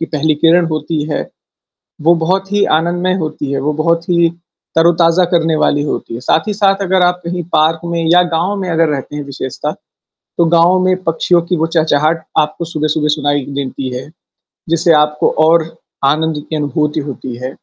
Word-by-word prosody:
की 165 - -2
पहली 155 +1 +1
किरण 165 +3 +3
होती 155 -1 -2
है, - - -1 0.8
वो 170 +3 +5
बहुत 190 +3 -1
ही 205 0 +2
आनंदमय 175 +2 -1
होती 150 -2 -4
है, 140 - -1
वो 150 +2 -1
बहुत 165 +1 +1
ही 170 -1 +3 0.5
तरोताज़ा 170 +1 +4
करने 165 -2 +2
वाली 145 - +2
होती 145 - -4
है, 115 - -5
साथ 160 +7 +1
ही 210 - -1
साथ 195 -1 +1
अगर 190 -1 +1
आप 180 0 0
कहीं 175 0 -3
पार्क 160 +1 +2
में 170 -1 -2
या 180 - +6
गाँव 185 +5 0
में 185 - -3
अगर 165 -1 +2
रहते 145 0 -4
हैं 145 - -4
विशेषता। 135 -2 -5 0.7
तो 170 - +3
गाँव 180 +3 +4
में 185 0 +3
पक्षियों 170 +1 +2
की 180 - +2
वो 160 +1 0
चहचाहट 160 0 +2 0.2
आपको 155 +2 -1
सुबह-सुबह 155 -1 -1
सुनाई 145 -1 0
देती 135 -1 -4
है, 130 +4 -7 0.6
जिससे 165 0 +3
आपको 150 0 0 0.2
और 165 -1 +2 0.3
आनंद 150 +1 0
की 155 - -3
अनुभूति 150 +1 -1
होती 125 -2 -7
है। 130 - -5
160 Hz, 185 wpm, -15 LUFS, 150-170 Hz, 0.8 s, या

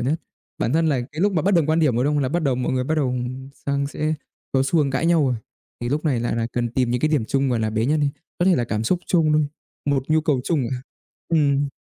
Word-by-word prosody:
nhất. 145 +7 0 0.4
Bản 120 - 0
thân 165 +1 +3
là 140 -4 +1
cái 155 - -5
lúc 205 +2 +3
mà 165 -4 +1
bất 200 +2 +3
đồng 165 -4 +3
quan 155 +1 +2
điểm, 135 -7 +3
đúng 125 - +2
không? 145 +1 +2
Là 135 -2 +1
bắt 170 +5 -1
đầu 135 -4 +2
mọi 125 +1 -1
người 130 -1 0
bắt 155 - 0
đầu 135 -5 +1 0.5
sang 140 0 0
sẽ 155 +2 -1 0.4
có 135 -1 +3
xu 140 +5 0
hướng 145 -3 +2
cãi 135 +5 0
nhau 165 -3 +4
rồi, 125 - 0 0.4
thì 120 - -2
lúc 150 +5 -1
này 135 -7 +1
lại 120 0 -1
là 115 0 0
cần 120 -1 0
tìm 125 +1 0
những 125 0 0
cái 155 - +2
điểm 150 -7 +1
chung 135 +4 +1
gọi 120 -3 +1
là 110 - 0
bế 110 +2 0
nhân 150 +1 +2
đi, 145 -1 +2 0.3
có 175 - +2
thể 185 0 +5
là 120 - +1
cảm 110 0 -2
xúc 180 +8 +2
chung 160 -4 +3
thôi, 150 -1 +3 0.4
một 135 -2 +1
nhu 155 0 +4
cầu 150 -4 +1
chung 150 -3 +1
ch - - -2
hạn. 125 - -6 0.5
Ừm. 145 -3 +2
140 Hz, 295 wpm, -22 LUFS, 125-155 Hz, 0.5 s, thể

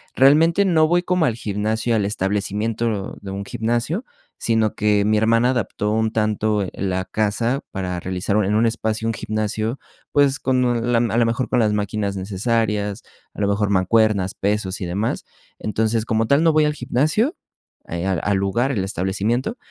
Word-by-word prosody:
realmente 160 +8 +5
no 165 -4 +4
voy 175 +1 +2
como 180 -1 +1
al 120 - 0
gimnasio, 110 +2 -1
al 105 - +1
establecimiento 105 +2 -2
de 95 -1 -7
un 100 +1 -5
gimnasio, 120 - -1 0.3
sino 110 -2 +1
que 105 -1 +2
mi 110 - +3
hermana 115 +3 +3
adaptó 105 -3 -2
un 110 0 +1
tanto, 105 -1 0
eh, 95 - -5
la 95 -1 -2
casa 110 +7 0
para 90 -2 -3
realizar, 95 +2 -2
en 100 - 0
un 115 - +3
espacio 110 -1 -2
un 115 - 0
gimnasio, 110 +3 -2 0.3
pues 145 -1 +3
con 120 -2 +1
la - - +4
a 115 -1 0
lo 120 - +4
mejor 120 +3 -1
con 125 - +2
las 110 -2 +3
máquinas 105 -1 -2
necesarias, 105 +1 -1 0.3
a - - -11
lo 100 - +2
mejor 100 0 +1
mancuernas, 100 0 +2
pesos 100 -1 -1
y - - -2
demás, 95 +6 -2 0.3
entonces, 110 +1 0
como 110 0 0
tal, 140 +5 +3
no 165 - +5
voy 155 0 +4
al 150 - +1
gimnasio, 155 - 0 0.5
eh, 85 +2 -3
al 95 -3 0
al 100 0 +1
lugar, 115 +7 0
el 100 -6 -1
establecimiento, 100 - -1
110 Hz, 175 wpm, -21 LUFS, 100-120 Hz, 0.5 s, realmente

